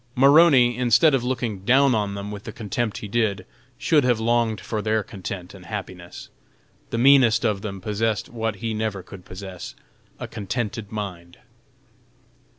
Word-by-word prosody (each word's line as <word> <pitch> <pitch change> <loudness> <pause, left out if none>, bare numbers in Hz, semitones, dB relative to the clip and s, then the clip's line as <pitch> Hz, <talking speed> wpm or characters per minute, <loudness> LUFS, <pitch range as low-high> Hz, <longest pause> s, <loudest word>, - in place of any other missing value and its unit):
Maroney, 135 -3 +6
instead 125 +5 +4
of 130 -3 +1
looking 120 -5 -2
down 130 +7 +4
on 105 -2 -1
them 100 +1 -6
with 105 -1 -8
the - - -6
contempt 110 -1 -3
he 105 - -6
did, 105 -1 -1 0.3
should 150 -3 +3
have 125 -3 +2
longed 115 -2 +1
for 110 +2 -4
their 110 0 0
content 95 -2 -7
and 90 -3 -13
happiness. 95 -4 -8 0.6
The 115 - -3
meanest 125 -3 +5
of 105 -3 0
them 100 -2 -6
possessed 105 +1 -1
what 115 -2 -3
he 115 +2 -4
never 105 -3 -3
could 95 0 -12
possess 95 -1 -9 0.4
"a - - -5
contented 105 0 -4
mind." 90 -5 -6
110 Hz, 155 wpm, -23 LUFS, 100-120 Hz, 0.6 s, Maroney